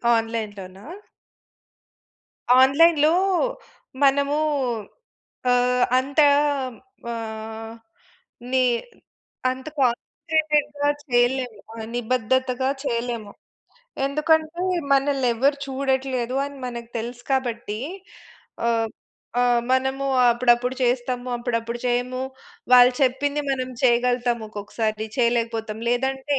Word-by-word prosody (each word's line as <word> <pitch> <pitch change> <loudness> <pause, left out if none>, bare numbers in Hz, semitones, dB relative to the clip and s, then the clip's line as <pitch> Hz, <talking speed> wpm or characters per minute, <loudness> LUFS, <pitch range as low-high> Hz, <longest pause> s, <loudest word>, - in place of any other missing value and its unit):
ఆన్‌లైన్‌లోనా? 210 -4 -4 1.7
ఆన్‌లైన్‌లో 305 +3 +5 0.9
మనము 280 +1 +3 1.1
ఆహ్, 250 0 +3 0.2
అంత 280 +3 -2 0.9
ఆహ్, 225 0 -6 0.8
ని 260 -1 +3 0.9
అంత 260 +3 -8
కాన్సంట్రేటెడ్‌గా 295 +3 0 0.2
చేయలేము, 245 -2 +1 0.4
నిబద్దతగా 255 +2 0
చేయలేము. 235 -5 -3 0.8
ఎందుకంటే, 315 +4 +1 0.3
మనల్ని 275 -2 +2
ఎవరు 280 +5 +2
చూడట్లేదు 265 -2 -1
అని 280 0 -7
మనకు 235 -1 -6
తెలుసు 240 +2 -6
కాబట్టి 235 -5 -2 0.9
ఆహ్, 225 -1 +1 0.5
ఆహ్, 245 -1 +3
మనము 265 +1 0 0.3
అప్పుడప్పుడు 240 +1 +2
చేస్తాము, 245 0 0
అప్పుడప్పుడు 235 -1 -2
చేయము. 250 +1 -1 0.5
వాళ్ళు 250 0 +8
చెప్పింది 285 +3 +1
మనం 260 -1 -1
చేయగలుగుతాము 245 -1 +2
ఒక్కొక్కసారి 215 +1 -3
చేయలేకపోతాం. 230 -2 0
లేదంటే 265 +3 0
250 Hz, 75 wpm, -23 LUFS, 235-270 Hz, 1.7 s, వాళ్ళు